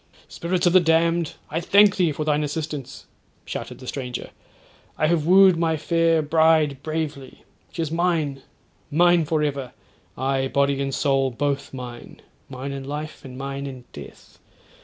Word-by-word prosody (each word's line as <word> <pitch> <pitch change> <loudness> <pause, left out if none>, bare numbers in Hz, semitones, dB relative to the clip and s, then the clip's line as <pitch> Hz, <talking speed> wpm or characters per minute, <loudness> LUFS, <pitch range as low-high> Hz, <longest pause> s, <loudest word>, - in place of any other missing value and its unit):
'Spirits 175 +2 -2
of 175 - +4
the 185 - +8
damned, 165 0 +2 0.2
I 160 - 0
thank 200 +3 +5
thee 175 -4 +2
for 150 +1 -3
thine 150 0 +1
assistance,' 150 -2 -5 0.4
shouted - - -6
the 130 - -12
stranger; 125 -2 -5 0.7
'I - - +2
have 155 -1 +1
wooed 190 -1 +7
my 165 -1 +1
fair 165 +1 +2
bride 155 -3 +3
bravely. 155 -4 -5 0.3
She 165 - -3
is 155 - -4
mine—mine 165 +1 0
for 155 0 0
ever.—Aye, 135 -1 -4
body 140 0 +1
and 135 -1 -2
soul 135 -2 +1
both 140 +3 -2
mine; 125 -2 -9 0.3
mine 135 +1 -6
in 135 -1 -5
life, 150 +3 -6
and 130 -1 -10
mine 140 +1 -5
in 130 -2 -8
death. - - -12
150 Hz, 150 wpm, -23 LUFS, 135-165 Hz, 0.7 s, the